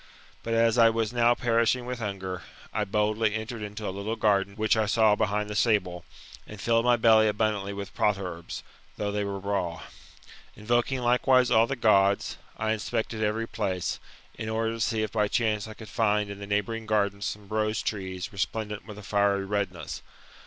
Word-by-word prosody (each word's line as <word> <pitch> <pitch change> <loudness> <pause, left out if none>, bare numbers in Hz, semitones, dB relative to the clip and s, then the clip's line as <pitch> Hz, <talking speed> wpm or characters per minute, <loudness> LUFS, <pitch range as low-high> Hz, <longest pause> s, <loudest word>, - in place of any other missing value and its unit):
But 115 0 -2
as 115 +1 +3
I 115 -1 +8
was 115 0 -1
now 120 0 +4
perishing 120 +1 +1
with 125 0 -4
hunger, 95 -4 -4 0.3
I - - 0
boldly 105 +1 +1
entered 110 +1 -5
into 105 0 -5
a - - -2
little 100 +3 -3
garden 100 -3 +1
which 110 +1 +2
I 110 -1 +1
saw 110 0 +4
behind 105 0 0
the 105 - -5
stable, 90 -7 +1 0.4
and 105 - -10
filled 115 +2 +2
my 125 0 +5
belly 110 -1 +5
abundantly 105 -2 0
with 100 -1 -6
potherbs, 90 -5 -2 0.3
though 105 -1 -2
they 105 0 -1
were 100 -1 -3
raw. 95 -4 -2 0.7
Invoking 120 +4 0
likewise 125 +1 +3
all 115 +1 +5
the. 135 - -2
Gods, 100 -4 +3 0.2
I 110 0 0
inspected 110 0 -2
every 110 +2 0
place, 95 -6 -2 0.4
in 110 - -3
order 110 0 0
to 115 - -6
see 110 0 0
if 110 - -3
by 105 -2 +1
chance 105 -1 0
I 110 - -9
could 110 - -11
find 105 -2 +1
in 100 - -8
the 100 - -7
neighbouring 105 +2 -1
gardens 100 -2 0
some 105 -1 -5
rose 110 0 0
trees 95 -3 -4
resplendent 105 +2 -3
with 105 -2 -9
a 105 - -9
fiery 100 -1 +1
redness. 95 -5 -3
105 Hz, 185 wpm, -27 LUFS, 100-115 Hz, 0.7 s, I